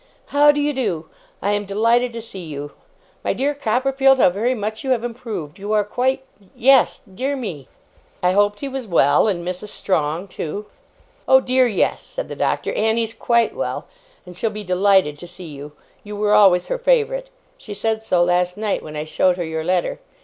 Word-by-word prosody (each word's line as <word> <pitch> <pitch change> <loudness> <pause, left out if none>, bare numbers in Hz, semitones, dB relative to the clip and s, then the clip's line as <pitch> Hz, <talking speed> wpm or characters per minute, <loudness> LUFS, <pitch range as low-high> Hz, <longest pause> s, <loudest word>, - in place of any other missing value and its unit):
How 290 +1 +6
do 290 - -2
you 290 0 +1
do? 185 - -2 0.3
I 200 - +1
am 205 0 0
delighted 230 +5 +2
to 230 -1 -6
see 195 -5 -9
you. 145 -2 -7 0.5
My - - 0
dear 285 +2 0
Copperfield, 270 +1 +2
how 185 - +5
very 230 +7 0
much 215 0 -4
you 270 - -3
have 245 -3 +1
improved! 225 - -6
You 205 +2 -3
are 210 -1 +3
quite 260 +5 -1 0.3
yes 265 +1 +4
dear 255 +8 -3
me!' 180 - -6 0.6
I 180 - +4
hoped 205 +1 +2
he 280 - -3
was 265 -3 -5
well, 145 -2 +4
and 175 -4 -2
Mrs. 180 +3 -4
Strong 175 -2 -1
too. 190 +5 -5 0.6
'Oh 265 - +7
dear, 255 0 +2
yes!' 210 -5 0
said - - -5
the - - -5
Doctor; - - -1
'Annie's 225 +1 0
quite 235 0 +1
well, - - -3 0.4
and 180 -1 -11
she'll 220 +5 -1
be 210 0 -7
delighted 185 -5 +2
to 175 - -9
see 180 +1 -10
you. 145 0 -9 0.3
You 210 0 -7
were 210 0 +1
always 195 -4 +5
her - - -3
favourite. - - +1 0.3
She 205 - -8
said 220 +1 -1
so, 180 -5 +2
last 180 +1 +1
night, 210 -1 -1
when 155 -1 -9
I 150 - -3
showed 180 +3 +1
her 175 - -2
your 160 0 -3
letter. 180 +1 0
210 Hz, 195 wpm, -21 LUFS, 180-250 Hz, 0.6 s, Oh